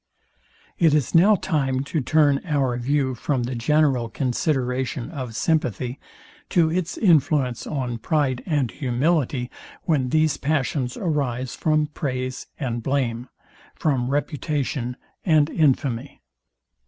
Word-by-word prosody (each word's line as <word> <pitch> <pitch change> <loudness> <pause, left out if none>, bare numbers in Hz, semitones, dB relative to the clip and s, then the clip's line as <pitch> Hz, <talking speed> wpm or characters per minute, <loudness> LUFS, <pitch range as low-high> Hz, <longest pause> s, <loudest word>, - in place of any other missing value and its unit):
It 160 -3 +5
is 145 -5 0
now 195 +6 +6
time 135 -8 0
to 150 +2 -2
turn 145 +1 +3
our 140 -7 0
view 130 +1 0
from 125 +1 -1
the 125 +2 -3
general 130 -1 +2
consideration 130 -2 -1
of 130 -7 -6
sympathy, 125 - -1 0.5
to 165 -3 +3
its 180 +1 -2
influence 145 - +2
on 125 -5 -3
pride 135 -2 0
and 145 -8 0
humility, 135 -1 0 0.3
when 140 -6 +1
these 155 +1 +2
passions 140 -3 -1
arise 135 -7 -1
from 155 -1 +1
praise 130 -4 -4
and 120 -5 -2
blame, 125 -2 -1 0.5
from 130 -5 0
reputation 140 -3 -2 0.3
and 155 -4 +3
infamy. 135 -4 0
140 Hz, 115 wpm, -23 LUFS, 125-155 Hz, 0.5 s, now